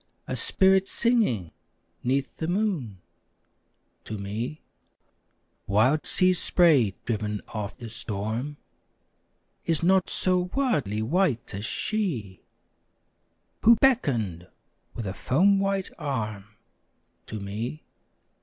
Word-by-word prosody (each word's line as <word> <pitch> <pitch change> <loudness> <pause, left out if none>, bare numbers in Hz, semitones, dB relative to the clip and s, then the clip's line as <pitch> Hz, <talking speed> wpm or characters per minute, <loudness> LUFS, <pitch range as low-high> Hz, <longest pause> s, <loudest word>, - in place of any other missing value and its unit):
A - - -2
spirit 190 0 +3
singing 210 - +1 0.5
'neath 135 +2 -1
the 160 - -3
moon 170 - -1 1.0
To 110 - -5
me. 110 +9 -5 1.0
Wild 125 +10 +3
sea 185 0 +4
spray 150 - +4
driven 105 -2 -2
of 105 0 -5
the 120 -3 -8
storm 110 +6 -4 1.1
Is 165 -1 +1
not 190 +1 +3
so 180 -1 +1
wildly 145 - 0
white 150 - 0
as 100 +2 -4
she, 125 - -2 1.2
Who 230 +2 +7
beckoned 120 - +1 0.5
with 115 - -4
a 95 - -3
foam 190 - +3
white 195 -1 -1
arm 110 -9 -3 0.8
To 110 - -5
me. 110 +9 -5
130 Hz, 100 wpm, -26 LUFS, -, 1.2 s, Who